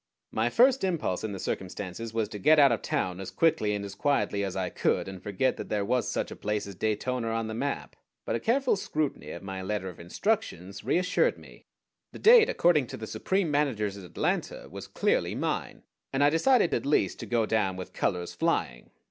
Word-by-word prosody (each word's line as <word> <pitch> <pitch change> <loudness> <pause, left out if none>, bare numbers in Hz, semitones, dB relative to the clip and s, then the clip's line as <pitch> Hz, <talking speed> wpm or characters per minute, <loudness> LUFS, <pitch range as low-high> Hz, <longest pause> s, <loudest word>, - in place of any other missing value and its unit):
My 110 +2 +1
first 255 - +4
impulse 170 - -1
in 110 - -3
the 100 - -5
circumstances 95 +4 -4
was 110 -1 -1
to 105 -2 -7
get 155 +6 +5
out 140 -3 +7
of 115 - 0
town 90 0 -2
as 95 - -5
quickly 110 -11 +2
and 100 0 -4
as 100 - -7
quietly 100 -4 0
as 95 -2 -3
I 95 -1 -2
could, - - 0
and 95 -1 -8
forget 105 +6 0
that - - -7
there 105 -1 0
was 125 +3 0
such - - -2
a - - -6
place 105 0 -2
as 100 - -8
Daytona 115 +4 -1
on 115 0 -1
the 110 - -5
map; 140 +5 -3 0.3
but - - -1
a - - -1
careful 255 - +2
scrutiny 155 -6 -3
of - - -7
my 95 -1 -5
letter 95 0 -3
of 90 - -12
instructions 100 - -2
reassured 180 - +2
me. - - -16 0.5
The - - -8
date, 455 0 +7
according 165 - +3
to - - -7
the 110 - -6
supreme 180 - -1
managers 120 -9 0
at 100 - -10
Atlanta, 90 - -2
was - - -8
clearly - - 0
mine, - - -3 0.3
and 135 +1 +1
I 145 - +5
decided 205 - +3
at - - 0
least 100 -10 +1
to - - -6
go 115 -2 +1
down 105 -4 +1
with 95 0 -8
colors 90 -1 -1
flying. - - -1
110 Hz, 210 wpm, -28 LUFS, 100-150 Hz, 0.5 s, out